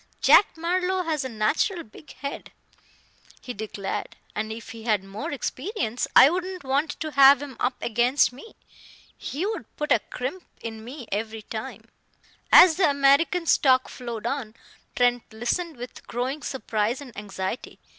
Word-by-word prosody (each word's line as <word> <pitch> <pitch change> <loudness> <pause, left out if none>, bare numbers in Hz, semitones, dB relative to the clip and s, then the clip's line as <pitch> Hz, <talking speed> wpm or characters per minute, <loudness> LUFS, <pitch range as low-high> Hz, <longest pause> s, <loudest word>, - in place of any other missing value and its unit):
"Jack 400 - +5
Marlowe 365 +2 0
has 310 -4 -1
a 260 - -4
natural 280 - 0
big 225 +7 -15
head," 280 +2 -7 0.9
he 250 - -7
declared, 205 -2 -5 0.2
"and 215 +1 -3
if 225 0 -8
he 225 0 -9
had 215 -4 +1
more 205 +12 -6
experience, 265 - -3
I - - +10
wouldn't 365 +2 -3
want 275 +4 -1
to 310 -1 -3
have 275 -1 +7
him 285 -3 -8
up 250 +1 0
against 245 +3 +2
me. 280 - -13 0.6
He 310 +7 -4
would 440 +1 -3
put 300 - -4
a - - +6
crimp 265 - -6 0.2
in 220 -1 -7
me 250 +1 -9
every 220 +1 -3
time." 220 +1 -7 0.7
As 345 -4 +8
the 365 -5 +4
American's 285 +5 +3
talk 260 -2 +4
flowed 235 -3 -7
on, 240 -4 -3 0.4
Trent 245 -1 +1
listened 250 +8 -2
with 245 +1 -10
growing 260 +5 -3
surprise 230 -4 -2
and 260 -5 -11
anxiety. 195 +2 -5
260 Hz, 155 wpm, -25 LUFS, 225-310 Hz, 0.9 s, I